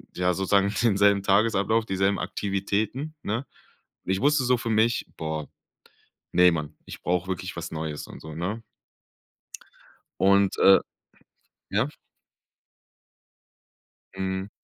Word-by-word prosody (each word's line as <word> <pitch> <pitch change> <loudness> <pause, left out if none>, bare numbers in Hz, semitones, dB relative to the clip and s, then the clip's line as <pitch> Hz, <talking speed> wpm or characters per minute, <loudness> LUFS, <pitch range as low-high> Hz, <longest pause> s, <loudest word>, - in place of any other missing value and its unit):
ja, 90 0 +1
sozusagen 100 +2 +2
denselben 100 -3 +4
Tagesablauf, 110 +2 +2
dieselben 95 0 +1
Aktivitäten, 105 +9 -2
ne? 115 +6 -2 0.6
Und - - -1
ich 95 +3 0
wusste 145 -1 +3
so 125 0 +3
für 115 0 -4
mich: 110 +2 +2
„Boah, 80 -1 -4 0.9
ne, 90 0 +6
man, 75 -2 -4
ich - - -10
brauch 90 +1 0
wirklich 95 0 -4
was 85 0 -5
Neues 80 -2 -5
und - - -11
so“, 80 0 -9
ne? 100 +7 -3 1.6
Und, 100 0 +4
äh, 95 0 +7 0.9
ja? 110 +8 +1 2.3
Mhm. 95 +1 -3
100 Hz, 115 wpm, -26 LUFS, 90-110 Hz, 2.3 s, äh